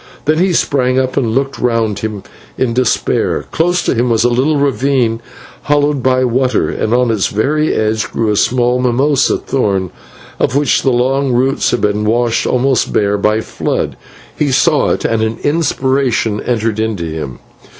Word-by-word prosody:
Then 155 +2 +2
he 185 +1 +2
sprang 130 -6 +1
up 130 -1 0
and 115 -4 0
looked 135 +1 -1
round 115 -4 0
him 105 -2 -5 0.3
in 125 -3 0
despair. 125 -1 0
Close 175 +2 +1
to - - 0
him 120 0 0
was 115 -1 +2
a 120 - +3
little 135 +5 +1
ravine 135 -4 0 0.4
hollowed 145 -1 +1
by 130 0 +2
water, 125 +1 +1
and 110 - -2
on 125 0 +2
its 105 -3 0
very 150 +9 0
edge 110 0 -1
grew 110 -2 -1
a - - 0
small 125 +3 +1
mimosa 130 +3 +2
thorn 95 - -1 0.5
of - - 0
which 145 -2 +2
the 135 - +1
long 130 +2 +1
roots 130 +3 +1
had 120 - -1
been 105 0 0
washed 115 +1 +1
almost 130 0 +1
bare 100 -1 +1
by 105 +1 +2
a 110 - -1
flood. - - -3 0.4
He 145 -2 0
saw 150 +4 +2
it, - - -1
and 115 -1 0
an 110 +1 -1
inspiration 130 -7 0
entered 110 -2 -1
into 110 -6 -2
him. 75 -5 -6
125 Hz, 175 wpm, -14 LUFS, 110-135 Hz, 0.5 s, a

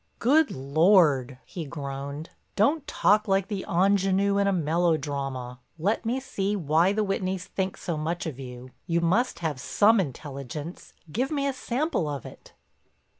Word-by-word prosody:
"Good 290 +5 +4
Lord!" 140 -2 +3
he 175 -4 -6
groaned. 140 0 -6 0.2
"Don't 280 +9 +2
talk 210 +1 +3
like 195 0 +1
the 200 -3 -3
ingénue 195 +2 +2
in 200 - +2
a - - +3
melodrama. 145 -7 -1 0.2
Let 205 +7 0
me 250 +3 0
see 205 -6 -2
why 165 +1 +2
the 215 +1 0
Whitneys 190 -1 -2
think 190 -1 -3
so 170 -4 -3
much 165 +4 -2
of 145 -5 -5
you. 125 -1 -9 0.2
You 170 0 +1
must 190 +10 +1
have 150 -5 -1
some 215 - +4
intelligence—give 150 - -5
me 285 -2 -1
a 275 - 0
sample 255 - -1
of 145 -4 -4
it." - - -12
175 Hz, 150 wpm, -26 LUFS, 145-205 Hz, 0.2 s, Good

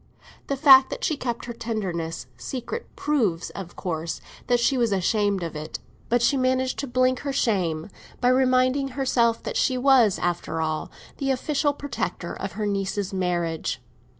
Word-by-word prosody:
The 275 - -1
fact 265 -2 +8
that - - -6
she 310 - +1
kept 240 -4 -4
her 240 - -5
tenderness 180 - -3
secret 260 - -5
proves, 220 - 0
of 185 -3 -8
course, 165 -3 -3 0.3
that 245 -1 +3
she 235 +3 +2
was 235 -4 +1
ashamed 200 0 +1
of 165 -2 -5
it; 155 +1 -5 0.3
but 240 0 +2
she 275 +3 +3
managed 260 0 +1
to 280 - -2
blink 255 +1 +2
her 280 - -3
shame 180 - 0 0.3
by 245 - +3
reminding 255 +1 +3
herself 235 -4 +2
that - - -3
she 255 - +2
was, 250 -6 +5
after 175 -2 -2
all, 155 -1 -2 0.3
the 275 - -2
official 290 +2 +1
protector 285 0 -4
of 195 -3 -5
her 210 +2 -3
niece's 200 -1 -2
marriage. 175 -3 -1
235 Hz, 165 wpm, -25 LUFS, 180-260 Hz, 0.3 s, fact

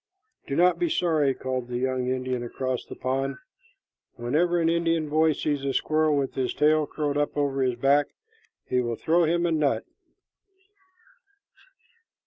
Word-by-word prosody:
"Do 140 - -2
not 180 +2 +3
be 345 - +1
sorry," 155 - +1
called 130 -2 -3
the 120 0 -3
young 130 0 -1
Indian 130 -1 -2
across 130 +1 -3
the - - -10
pond. 135 +2 -2 0.8
"Whenever 160 +9 +1
an 165 - +2
Indian 165 -2 +1
boy 155 +1 +3
sees 145 -1 -2
a 135 -1 -1
squirrel 155 -1 +2
with 135 -1 -1
his 130 -1 -2
tail 155 0 +3
curled 145 -1 -2
up 145 0 -1
over 140 -2 0
his 130 -2 +1
back, 140 +4 +3 0.6
he 125 0 +1
will 120 -1 -2
throw 170 +7 +2
him 170 +2 +1
a 170 - +1
nut." 150 -3 +1
145 Hz, 155 wpm, -26 LUFS, 130-160 Hz, 0.8 s, not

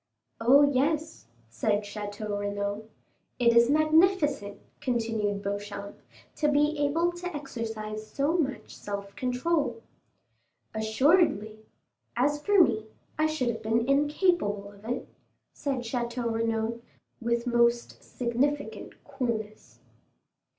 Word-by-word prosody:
"Oh, 260 +5 +6
yes," 295 +3 0 0.2
said 205 - 0
Château 205 0 -5
Renaud. 205 +1 -3 0.5
"It 235 -1 +4
is 235 +1 +6
magnificent," 310 - +3 0.2
continued 225 -4 -1
Beauchamp, 200 0 -5 0.4
"to 300 - +2
be 295 +1 +3
able 325 +4 +2
to 350 -1 -6
exercise 220 -6 -5
so 285 +4 0
much 285 -6 -2
self 200 -1 -6
control!" 250 -1 -1 0.9
"Assuredly; 220 - +2 0.6
as 290 +4 +1
for 405 -3 +6
me, 220 -6 -1 0.3
I 310 - +4
should 310 -6 -1
have 225 -1 -3
been 225 +2 +1
incapable 285 - +1
of 200 +1 -17
it," 245 - -3 0.5
said 275 -3 -2
Château 235 0 -2
Renaud, 225 0 -1 0.4
with 235 0 0
most 235 -1 +1
significant 265 +4 -2
coolness. 235 -7 -4
235 Hz, 110 wpm, -28 LUFS, 215-290 Hz, 0.9 s, Oh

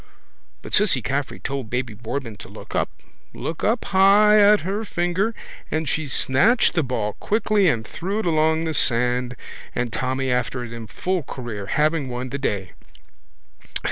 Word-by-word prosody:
But - - -9
Cissy 185 - +3
Caffrey 135 +3 -2
told 135 -4 -4
baby 125 -1 -2
Boardman 115 0 -5
to - - -11
look - - -11
up, - - +1 0.5
look 160 - -5
up 225 +2 +1
high 200 +2 +6
at 205 0 +6
her 200 +6 -2
finger 190 +3 -1 0.3
and 155 0 -1
she 155 +1 -1
snatched 140 - +3
the 165 - +2
ball 115 -6 -2
quickly 210 -3 +2
and 115 -6 -1
threw 190 - -4
it 220 - -1
along 160 -1 +2
the 160 -1 -2
sand 125 -1 +1 0.4
and 125 -3 -2
Tommy 130 +1 -1
after 125 0 -1
it 115 -1 -7
in 115 -1 -7
full 185 - -2
career, 120 -7 -6
having 150 +2 +1
won 125 +1 -4
the 140 - -4
day. 100 -8 -2
140 Hz, 165 wpm, -23 LUFS, 125-190 Hz, 0.5 s, high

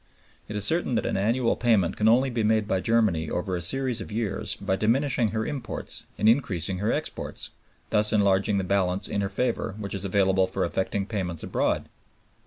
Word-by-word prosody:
It 105 - -6
is 105 -1 +3
certain 160 -4 +3
that - - 0
an - - -1
annual 115 +5 +1
payment 110 -8 +2
can 105 - +1
only 125 +4 +4
be 120 -1 -1
made 110 -1 +2
by 95 -3 +1
Germany 95 -8 +1
over 90 +1 -2
a 90 - -3
series 125 +4 0
of 110 - -7
years 105 -1 -2
by 100 -1 -1
diminishing 120 +3 +1
her 110 +1 -2
imports 145 -4 -4
and 105 - +2
increasing 95 - +1
her 105 +3 0
exports, - - -4 0.4
thus 105 0 +2
enlarging 100 -1 +2
the 95 - 0
balance 95 -1 0
in 100 - -2
her 100 - -1
favor 100 -1 -2
which 100 -2 -5
is 100 -1 -3
available 95 -1 +2
for 95 - -1
effecting 95 +1 -2
payments 95 -6 -3
abroad. - - -1
105 Hz, 195 wpm, -26 LUFS, 95-115 Hz, 0.4 s, only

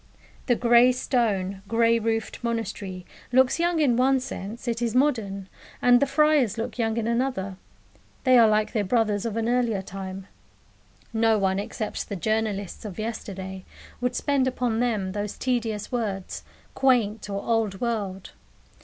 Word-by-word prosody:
The 245 - +4
grey 240 +1 +5
stone, 200 -7 0
grey 230 +1 +3
roofed 225 +1 -2
monastery 205 -6 -3 0.3
looks 260 +4 +4
young 340 -1 +1
in 270 -6 +3
one 265 +2 +3
sense 235 -1 -7
it 235 0 -1
is 235 -1 -1
modern; 220 -9 +1 0.3
and 245 0 +5
the 280 - +2
friars 300 -6 +3
look 225 +2 -4
young 225 -1 0
in 230 - 0
another 235 -5 -1 0.7
they 255 -1 +5
are 230 - +7
like 215 0 +1
their 215 - +1
brothers 215 0 +1
of 225 -1 -4
an 225 0 0
earlier 235 -5 +1
time. 190 0 -7 0.9
No 225 -1 +3
one, 190 -1 +1
except 210 +1 -4
the 200 - -3
journalists 210 -1 -2
of 205 -5 -7
yesterday, 190 -4 -5 0.4
would 250 0 0
spend 280 -3 +1
upon 245 -3 -1
them 215 -6 0
those 205 +1 -4
tedious 225 -5 -2
words, 205 -6 -3 0.3
"quaint," 225 -6 +2
or 200 0 -3
"old 220 -4 0
world." 205 -6 -3
225 Hz, 155 wpm, -25 LUFS, 200-245 Hz, 0.9 s, are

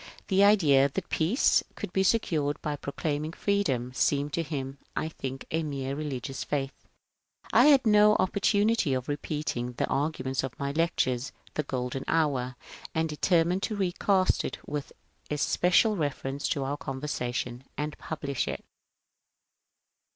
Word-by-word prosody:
The 195 0 +4
idea 150 -10 +5
that 175 +6 -4
peace 175 - +3
could - - -6
be 190 - +2
secured 160 -8 +1
by 150 -1 -1
proclaiming 150 +2 -3
freedom 135 -14 0
seemed 145 +2 +1
to 170 - +1
him, 140 -4 -5 0.2
I 160 - -1
think, 135 -4 -6
a 160 - +1
mere 140 -3 -3
religious 135 -3 -4
faith. 140 -2 -2 0.8
I - - +7
had 280 -4 +6
no 210 -1 +6
opportunity 200 -3 +2
of 130 -1 -2
repeat^ 150 +1 -3
ing 120 +1 -3
the - - 0
arguments 135 -3 -1
of 135 -2 -5
my 140 0 -2
lecture, 150 -5 +1 0.2
" - - -26
The - - 0
Golden 130 -2 -3
Hour," 135 -6 +1 0.4
and 160 0 +1
determined 170 +4 +2
to 215 - -2
recast 190 0 +2
it - - -4
with 145 -1 -4 0.4
especial 180 +8 +3
reference 145 -3 -2
to 140 - 0
our 140 +2 -2
conver 130 -1 -5
sation 125 -3 -3 0.2
and 150 0 -3
publisli 140 -4 -3
it. - - -9
150 Hz, 150 wpm, -28 LUFS, 135-175 Hz, 0.8 s, I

